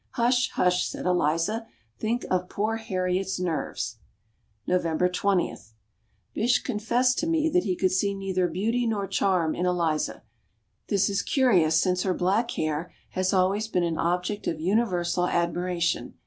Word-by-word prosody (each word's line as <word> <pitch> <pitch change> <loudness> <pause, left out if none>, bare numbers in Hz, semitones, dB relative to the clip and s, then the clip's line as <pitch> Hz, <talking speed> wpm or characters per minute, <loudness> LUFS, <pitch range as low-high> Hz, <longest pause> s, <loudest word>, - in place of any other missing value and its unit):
"Hush, 245 0 +2
hush!" 180 0 +2
said - - -6
Eliza, 180 +6 +1 0.3
"think 235 +3 -1
of 180 0 0
poor 215 +2 -1
Harriet's 190 -3 -2
nerves." 160 -8 -3 0.7
November 180 -1 +1
20. 180 0 0 0.8
Bysshe 245 +3 +2
confessed 245 +2 +1
to 320 - -1
me 320 -1 +2
that 360 +3 +2
he 185 -3 0
could 185 0 +1
see 200 +1 +1
neither 190 -2 0
beauty 230 +7 0
nor 210 -3 -1
charm 185 -4 +1
in 180 - -1
Eliza. 170 -4 -1 0.6
This 200 -2 +2
is 200 0 0
curious 180 - +3
since 180 0 +1
her 185 -2 0
black 205 +6 +1
hair 155 0 -2 0.2
has 185 0 0
always 195 +3 +2
been 180 -5 0
an 165 -2 -1
object 180 +4 -1
of 160 - -2
universal 180 -2 +1
admiration. 175 0 -1
185 Hz, 150 wpm, -26 LUFS, 175-215 Hz, 0.8 s, curious